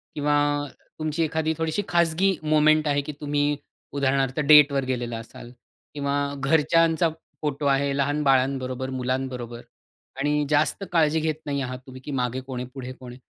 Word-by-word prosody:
किंवा 145 0 +1 0.7
तुमची 155 +1 -1
एखादी 160 0 0
थोडीशी 160 +4 -1
खाजगी 175 +3 +2
मोमेंट 155 0 +4
आहे 145 0 +2
की 150 - -4
तुम्ही 145 0 +1 0.4
उदाहरणार्थ 135 0 0
डेटवर 145 -2 +6
गेलेला 120 -2 -3
असाल 120 +1 -11 0.4
किंवा 140 -1 -2 0.3
घरच्यांचा 160 +4 +3 0.3
फोटो 145 -1 -2
आहे 140 0 +2
लहान 145 +2 0
बाळांबरोबर 130 -1 +1
मुलांबरोबर 125 -2 -3 0.6
आणि 150 +1 +1
जास्त 155 +6 +1
काळजी 160 -2 +3
घेत 155 -1 -1
नाही 140 -1 -2
आहात 125 0 -4
तुम्ही 130 0 -10
की 145 - -7
मागे 125 -1 -1
कोण 130 -1 -6
आहे, 125 - -5
पुढे 130 -2 -7
कोण 125 -1 -11
आहे. 125 - -12
140 Hz, 155 wpm, -25 LUFS, 130-155 Hz, 0.7 s, डेटवर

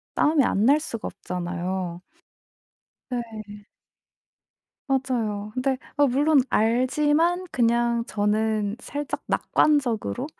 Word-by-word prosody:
싸움이 300 -2 +3
안 205 -3 +1
날 285 +4 +5
수가 230 -8 -5
없잖아요. 180 0 -4 1.1
네. 215 -4 -6 1.2
맞아요. 230 -6 -1
근데 260 +1 0 0.2
아 290 0 +5
물론 285 +3 +4
알지만 295 +10 +2
그냥 235 -1 +2
저는 210 0 0
살짝 290 +2 -5
낙관적으로 260 -4 +1
235 Hz, 195 characters per minute, -25 LUFS, 210-275 Hz, 1.2 s, 날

